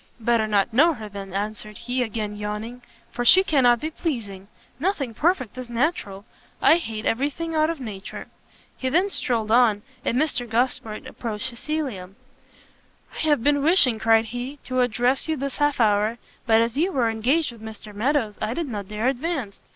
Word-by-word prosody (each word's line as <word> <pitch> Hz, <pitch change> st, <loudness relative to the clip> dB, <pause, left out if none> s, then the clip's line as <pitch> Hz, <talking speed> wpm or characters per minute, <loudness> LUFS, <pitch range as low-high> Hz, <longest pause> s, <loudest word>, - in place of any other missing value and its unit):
"Better 230 Hz, -1 st, +2 dB
not 210 Hz, +1 st, +1 dB
know 315 Hz, +6 st, +5 dB
her, 220 Hz, -3 st, -8 dB
then," 200 Hz, -1 st, -8 dB
answered 210 Hz, +2 st, -4 dB
he, 250 Hz, +1 st, -2 dB
again 215 Hz, -3 st, -3 dB
yawning, 210 Hz, +4 st, -5 dB, 0.3 s
"for 245 Hz, -, -3 dB
she 370 Hz, +10 st, +7 dB
cannot 250 Hz, -9 st, +4 dB
be 310 Hz, +5 st, -4 dB
pleasing. 210 Hz, -, -4 dB, 0.3 s
Nothing 295 Hz, -, -1 dB
perfect 275 Hz, -, 0 dB
is 250 Hz, -2 st, -7 dB
natural; 230 Hz, -, -1 dB, 0.3 s
I 325 Hz, -, +6 dB
hate 225 Hz, -9 st, -5 dB
every 270 Hz, +6 st, +1 dB
thing 330 Hz, +3 st, -5 dB
out 310 Hz, 0 st, +2 dB
of 330 Hz, -3 st, -3 dB
nature." 210 Hz, -6 st, -7 dB, 0.5 s
He 260 Hz, -, -2 dB
then 365 Hz, +8 st, +2 dB
strolled 225 Hz, -, -1 dB
on, 225 Hz, -4 st, +4 dB, 0.2 s
and 245 Hz, -, 0 dB
Mr 260 Hz, -5 st, 0 dB
Gosport 225 Hz, -2 st, -1 dB
approached 225 Hz, +1 st, -5 dB
Cecilia. 240 Hz, -7 st, -4 dB, 1.1 s
"I -, -, -7 dB
have 295 Hz, -6 st, +3 dB
been 285 Hz, 0 st, +3 dB
wishing," 280 Hz, -8 st, +5 dB
cried 225 Hz, 0 st, +4 dB
he, 245 Hz, +5 st, -6 dB
"to 255 Hz, 0 st, -2 dB
address 245 Hz, +3 st, +1 dB
you 315 Hz, -, 0 dB
this 275 Hz, 0 st, -4 dB
half 290 Hz, -2 st, +1 dB
hour, 215 Hz, 0 st, +2 dB, 0.3 s
but 225 Hz, 0 st, +5 dB
as 235 Hz, +4 st, -1 dB
you 360 Hz, +4 st, +2 dB
were 250 Hz, -7 st, +1 dB
engaged 255 Hz, +8 st, +1 dB
with 230 Hz, -2 st, -14 dB
Mr 220 Hz, -1 st, -9 dB
Meadows, 225 Hz, -1 st, 0 dB
I 215 Hz, +3 st, -1 dB
did 335 Hz, -1 st, -2 dB
not 205 Hz, -4 st, -5 dB
dare 215 Hz, +3 st, -2 dB
advance." 270 Hz, -, -2 dB
240 Hz, 180 wpm, -24 LUFS, 215-285 Hz, 1.1 s, she